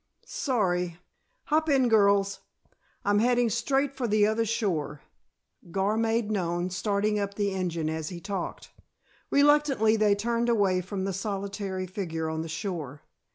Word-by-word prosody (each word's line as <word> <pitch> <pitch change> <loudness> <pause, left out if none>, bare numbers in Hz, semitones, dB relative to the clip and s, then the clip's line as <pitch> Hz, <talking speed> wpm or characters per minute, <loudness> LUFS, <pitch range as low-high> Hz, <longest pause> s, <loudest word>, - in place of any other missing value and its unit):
Sorry. 180 - -1 0.5
Hop 315 +1 +1
in, 270 -3 +4
girls. 200 -3 +3 0.7
I'm 205 0 +3
heading 240 0 +2
straight 270 +5 0
for 255 -3 -2
the 210 -1 +3
other 220 +2 +1
shore," 180 - -1 0.7
Gar 195 +4 0
made 225 -1 0
known, 175 -2 -1
starting 205 +3 0
up 200 0 -3
the 205 -1 0
engine 175 -4 -2
as 160 -1 -3
he 175 - -7
talked. 190 0 -5 0.6
Reluctantly 280 -6 +4
they 210 -1 +4
turned 235 +3 0
away 195 -5 +2
from 190 +1 -4
the 195 0 -2
solitary 195 -1 -3
figure 165 -4 -4
on 160 0 -2
the 165 - -6
shore. 155 -4 -5
200 Hz, 145 wpm, -27 LUFS, 180-225 Hz, 0.7 s, in